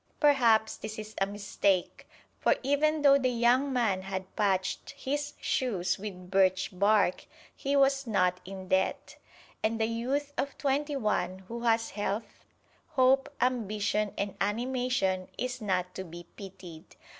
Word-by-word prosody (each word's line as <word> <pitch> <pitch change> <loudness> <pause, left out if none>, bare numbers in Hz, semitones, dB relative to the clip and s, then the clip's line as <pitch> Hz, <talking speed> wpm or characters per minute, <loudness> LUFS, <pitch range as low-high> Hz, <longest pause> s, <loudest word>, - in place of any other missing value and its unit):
Perhaps 235 -7 +4
this 215 0 -7
is 215 0 -7
a 195 - +3
mistake, 200 -2 -1 0.3
for - - +3
even 295 +3 +2
though 280 -1 +7
the 255 -1 +1
young 245 +3 +3
man 225 -7 +1
had 190 0 -6
patched 190 -3 0
his 290 +2 -2
shoes 195 -10 0
with 185 -3 -8
birch 190 0 +3
bark, 200 0 +2 0.3
he 275 +1 -1
was 275 -1 +3
not 180 -4 +2
in 190 0 -8
debt. 190 +1 0 0.4
And 225 +1 0
the 220 - +3
youth 260 +6 -2
of 280 - -2
twenty 290 +1 0
one 200 -6 -1
who 235 +3 -5
has 225 0 +2
health, 205 +1 -4 0.5
hope, 265 -1 +4
ambition 215 -4 0
and 200 -1 -2
animation 225 -3 0
is 250 0 -3
not 185 -3 -1
to 190 - -5
be 175 -1 -10
pitied. 180 -5 -11
215 Hz, 145 wpm, -29 LUFS, 190-255 Hz, 0.5 s, though